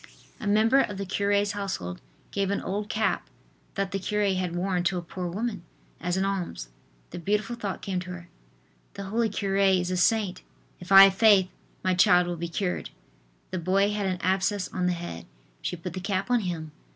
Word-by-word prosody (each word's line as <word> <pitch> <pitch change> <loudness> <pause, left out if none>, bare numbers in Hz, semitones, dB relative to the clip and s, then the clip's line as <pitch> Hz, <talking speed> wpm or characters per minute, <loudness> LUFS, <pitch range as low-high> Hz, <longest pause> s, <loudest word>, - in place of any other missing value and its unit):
A 215 - -5
member 220 +6 +4
of 205 -7 0
the 200 - -3
cure's 200 +1 +1
household 190 - -4 0.3
gave 195 -1 0
an 200 - 0
old 205 +2 -3
cap 215 - 0 0.5
that 195 -1 -1
the 195 - -1
cure 205 0 0
had 180 -2 -2
worn 180 0 0
to 180 +1 +1
a - - -2
poor 180 +1 -5
woman, 210 +4 -3 0.4
as 180 +1 -1
an 190 - +1
alms. 180 - -3 0.4
The - - -6
beautiful 210 +5 -1
thought 205 -5 -5
came 190 -2 -2
to 180 0 -7
her: 175 -1 -8 0.7
"The 200 - -5
holy 220 +4 0
cure 195 -1 -1
is 190 -2 +3
a 185 - 0
saint. 205 +1 +2 0.4
If 180 - -11
I 195 0 +11
have 195 -1 +6
faith, 195 -3 +5 0.3
my 185 - +2
child 180 0 +5
will 175 0 -3
be 170 +1 -4
cured." 180 +1 -2 0.6
The 185 - -2
boy 195 +4 +2
had 205 -1 -1
an 185 -1 -1
abscess 190 +1 0
on 180 -1 -1
the 180 - +2
head. 170 - -7 0.3
She - - -2
put 175 0 -7
the 185 - -4
cap 195 +3 -2
on 245 - +4
him. 170 -6 -4
190 Hz, 200 wpm, -27 LUFS, 180-205 Hz, 0.7 s, I